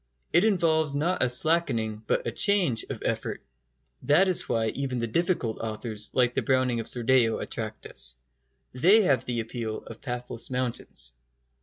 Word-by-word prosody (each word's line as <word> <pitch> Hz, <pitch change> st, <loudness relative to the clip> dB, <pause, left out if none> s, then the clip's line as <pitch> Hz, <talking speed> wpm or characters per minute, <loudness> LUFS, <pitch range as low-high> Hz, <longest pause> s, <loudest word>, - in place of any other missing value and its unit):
It 175 Hz, -, +5 dB
involves 160 Hz, -8 st, +2 dB
not 170 Hz, +6 st, 0 dB
a -, -, +3 dB
slackening, 125 Hz, -6 st, +1 dB
but -, -, 0 dB
a 115 Hz, -, -1 dB
change, 185 Hz, -, +2 dB
of -, -, -6 dB
effort. -, -, -3 dB, 0.6 s
That 165 Hz, +7 st, +4 dB
is 185 Hz, -, +3 dB
why 115 Hz, -1 st, +1 dB
even 135 Hz, +1 st, -3 dB
the 115 Hz, -, -1 dB
difficult 125 Hz, -, -1 dB
authors 110 Hz, -1 st, -3 dB
like 125 Hz, -1 st, +2 dB
the -, -, 0 dB
Browning 130 Hz, -2 st, +1 dB
of 115 Hz, -, -4 dB
Sordello 120 Hz, -1 st, +2 dB
attract 110 Hz, -1 st, -6 dB
us. 65 Hz, -1 st, -5 dB, 0.6 s
They 190 Hz, -, +5 dB
have 135 Hz, -9 st, +2 dB
the 120 Hz, -2 st, -1 dB
appeal 115 Hz, -1 st, -5 dB
of 115 Hz, -, -11 dB
pathless 125 Hz, -2 st, -4 dB
mountains. 120 Hz, -, -4 dB
125 Hz, 160 wpm, -27 LUFS, 115-155 Hz, 0.6 s, It